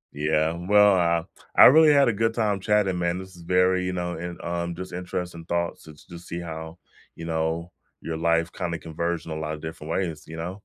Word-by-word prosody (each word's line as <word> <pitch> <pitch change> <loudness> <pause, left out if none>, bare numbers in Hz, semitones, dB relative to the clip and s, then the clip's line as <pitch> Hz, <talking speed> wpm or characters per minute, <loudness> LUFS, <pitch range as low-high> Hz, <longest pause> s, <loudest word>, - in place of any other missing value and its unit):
Yeah, 80 +2 +1
well, 100 +4 +4
uh, 85 -2 +2 0.3
I - - +9
really 155 +2 +8
had 140 -2 +5
a 115 - +2
good 115 +2 0
time 105 -4 0
chatting, 100 -3 +1
man, 85 +1 0
this 95 0 -9
is 85 - -13
very, 90 +1 +2
you 90 0 -2
know, 90 -1 -3
and, 85 +1 -6
um, 85 0 -3
just 95 -1 -8
interesting 90 -1 -5
thoughts 85 0 -2
t 80 - -11 0.2
to 85 - -9
see 85 0 -6
how, 80 0 -7 0.4
you 85 - -8
know, 80 +1 -2 0.3
your 80 -1 -5
life 85 0 +1
kinda 85 -1 -3
converged 85 +1 -3
in 80 - -7
a - - -3
lot 80 0 -3
of 75 - -12
different 80 -1 -8
ways, 85 -4 -2
you 80 0 -8
know? 90 +5 -6
85 Hz, 220 wpm, -25 LUFS, 80-90 Hz, 0.4 s, I